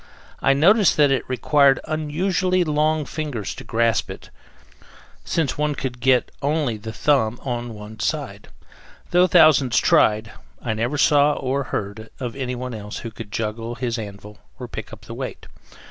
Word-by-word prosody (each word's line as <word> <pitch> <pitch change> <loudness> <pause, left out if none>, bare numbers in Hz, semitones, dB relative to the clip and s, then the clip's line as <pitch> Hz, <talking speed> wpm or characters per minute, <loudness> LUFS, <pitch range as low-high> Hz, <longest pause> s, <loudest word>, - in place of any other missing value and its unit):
I 135 - +4
noticed 190 +7 +4
that 145 -2 +5
it 130 -2 -1
required 135 +2 +3
unusually 180 +4 0
long 155 -1 +1
fingers 140 -12 -4
to - - -10
grasp 115 0 +1
it, - - -10 0.9
since 155 -4 -1
one 150 -1 0
could 130 -2 -5
get 125 0 +2
only 145 -5 0
the 110 +1 -7
thumb 120 -1 +1
on 120 -3 -4
one 105 +1 -10
side. - - -3 0.6
Though 180 +1 +5
thousands 145 -7 +5
tried, 110 +1 +3 0.3
I 115 - -2
never 120 +7 -2
saw, 145 0 +4
or 135 0 -2
heard, 110 0 -5
of 125 -3 -5
anyone 125 -1 -4
else 105 -1 -7
who 115 - -5
could 110 -2 -10
juggle 115 +2 -3
his 120 -1 -3
anvil 105 0 -9 0.2
or - - -7
pick - - -8
up - - -11
the - - -9
weight. - - -6
130 Hz, 160 wpm, -22 LUFS, 115-150 Hz, 0.9 s, that